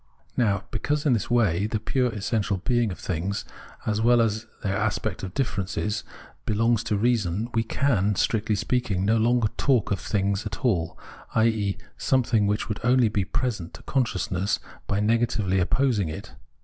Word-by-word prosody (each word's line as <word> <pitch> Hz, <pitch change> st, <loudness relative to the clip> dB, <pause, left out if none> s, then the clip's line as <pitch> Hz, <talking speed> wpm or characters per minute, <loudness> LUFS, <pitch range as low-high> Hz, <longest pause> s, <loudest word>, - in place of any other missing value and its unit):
Now 105 Hz, -4 st, +1 dB
because, 145 Hz, +7 st, -1 dB
in 140 Hz, -, +4 dB
this 115 Hz, -, -1 dB
way, 105 Hz, -5 st, +2 dB
the 110 Hz, 0 st, -1 dB
pure 125 Hz, +3 st, +1 dB
essential 105 Hz, -1 st, -1 dB
being 120 Hz, +2 st, +1 dB
of 90 Hz, -, -6 dB
things 90 Hz, +4 st, -3 dB, 0.4 s
as 110 Hz, 0 st, 0 dB
well 120 Hz, +1 st, +5 dB
as 110 Hz, 0 st, 0 dB, 0.2 s
their 95 Hz, -1 st, 0 dB
aspect 105 Hz, -1 st, -1 dB
of 95 Hz, -1 st, -6 dB
difference, 105 Hz, -4 st, -1 dB, 0.4 s
belongs 115 Hz, +1 st, +2 dB
to 105 Hz, -, 0 dB
reason, 110 Hz, -2 st, +1 dB
we 115 Hz, -, +2 dB
can, 110 Hz, -4 st, +1 dB
strictly 110 Hz, +2 st, +1 dB
speaking, 100 Hz, -3 st, 0 dB
no 110 Hz, +3 st, +3 dB
longer 115 Hz, 0 st, +3 dB
talk 130 Hz, -8 st, +2 dB
of 100 Hz, -, +1 dB
things 100 Hz, 0 st, 0 dB
at 105 Hz, +4 st, -6 dB
all, 90 Hz, -9 st, +1 dB, 0.4 s
i.e. 110 Hz, -3 st, +2 dB
of -, -, -21 dB, 0.2 s
something 120 Hz, -5 st, +2 dB
which 105 Hz, +1 st, 0 dB
would 105 Hz, -, -3 dB
only 125 Hz, -1 st, +4 dB
be 105 Hz, -3 st, 0 dB
present 105 Hz, -8 st, -2 dB
to -, -, -13 dB
consciousness 100 Hz, -6 st, 0 dB, 0.3 s
by 100 Hz, -, 0 dB
negatively 110 Hz, -3 st, +1 dB
opposing 105 Hz, -1 st, +1 dB
it. 75 Hz, -, -7 dB
110 Hz, 165 wpm, -25 LUFS, 100-120 Hz, 0.4 s, well